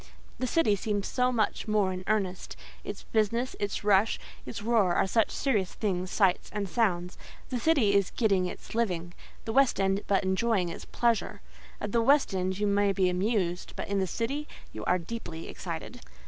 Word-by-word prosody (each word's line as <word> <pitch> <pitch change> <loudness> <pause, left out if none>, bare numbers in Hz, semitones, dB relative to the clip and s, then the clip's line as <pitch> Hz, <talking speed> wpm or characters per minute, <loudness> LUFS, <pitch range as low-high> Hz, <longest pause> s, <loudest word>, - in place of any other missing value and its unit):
The 255 - 0
city 240 -6 +3
seems 205 0 -2
so 250 0 +1
much 220 -2 0
more 210 -3 +2
in 185 0 -6
earnest: 195 -4 -1 0.3
its - - -6
business, 230 +3 0
its 205 0 -2
rush, 205 +1 +4 0.3
its 210 - -6
roar, 215 -6 +3
are - - +3
such 220 +3 +2
serious 210 -9 0
things, 185 -4 -1
sights, 190 -3 +2
and 205 -1 -2
sounds. 180 -5 0 0.3
The 250 - -1
city 255 -8 +3
is 200 -2 +3
getting 195 -6 +1
its - - -8
living—the 185 0 -3
West 270 -4 +4
End 195 +1 +2
but 195 -1 +2
enjoying 190 -1 +1
its 170 - -7
pleasure. 235 -3 0 0.4
At 210 - -4
the 235 - +3
West 275 -1 +4
End 185 0 -1
you 210 - 0
may 200 0 +2
be 190 -2 +2
amused, 180 -1 -1
but - - -5
in 200 -1 +1
the 190 - 0
city 275 - -2 0.3
you - - -6
are 180 - +3
deeply 170 -3 -6
excited. 180 +8 -6
205 Hz, 180 wpm, -29 LUFS, 185-230 Hz, 0.4 s, rush